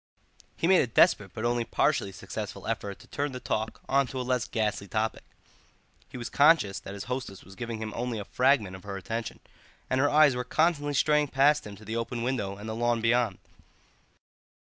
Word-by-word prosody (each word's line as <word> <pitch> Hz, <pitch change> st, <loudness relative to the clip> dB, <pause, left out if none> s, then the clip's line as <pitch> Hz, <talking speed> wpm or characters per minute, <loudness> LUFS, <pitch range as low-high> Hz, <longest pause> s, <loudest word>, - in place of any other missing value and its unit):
He -, -, -1 dB
made 185 Hz, +1 st, +6 dB
a -, -, 0 dB
desperate 100 Hz, -4 st, +3 dB
but 115 Hz, 0 st, -5 dB
only 120 Hz, 0 st, +1 dB
partially 100 Hz, -3 st, +1 dB
successful -, -, -7 dB
effort 100 Hz, -1 st, -3 dB
to -, -, -17 dB
turn 145 Hz, -1 st, -3 dB
the 125 Hz, -, -5 dB
talk 110 Hz, -2 st, -3 dB
on 135 Hz, 0 st, +2 dB
to 130 Hz, -, -5 dB
a -, -, -1 dB
less 125 Hz, -3 st, 0 dB
ghastly 105 Hz, -2 st, -1 dB
topic; 110 Hz, +3 st, -1 dB, 0.9 s
he -, -, -8 dB
was 120 Hz, -, -5 dB
conscious 145 Hz, -9 st, +4 dB
that 100 Hz, -, -8 dB
his 100 Hz, -, -6 dB
hostess 125 Hz, -7 st, -5 dB
was 95 Hz, -, -14 dB
giving 115 Hz, +2 st, -5 dB
him 110 Hz, -1 st, -5 dB
only 120 Hz, -1 st, -2 dB
a 100 Hz, -, -5 dB
fragment 125 Hz, -7 st, +2 dB
of 95 Hz, -, -11 dB
her 100 Hz, -1 st, -5 dB
attention, 110 Hz, +4 st, -5 dB, 0.5 s
and 130 Hz, 0 st, +2 dB
her 145 Hz, -, +3 dB
eyes 150 Hz, -3 st, +5 dB
were 125 Hz, -, -2 dB
constantly 145 Hz, -1 st, +1 dB
straying 150 Hz, +1 st, +3 dB
past 140 Hz, 0 st, +3 dB
him 100 Hz, -, -9 dB
to 110 Hz, +2 st, -15 dB
the 110 Hz, +3 st, -3 dB
open 115 Hz, +1 st, -3 dB
window 105 Hz, -6 st, -2 dB
and 105 Hz, +2 st, -8 dB
the 110 Hz, -, -3 dB
lawn 120 Hz, +1 st, +1 dB
beyond. 115 Hz, -3 st, +2 dB
120 Hz, 205 wpm, -28 LUFS, 105-135 Hz, 0.9 s, made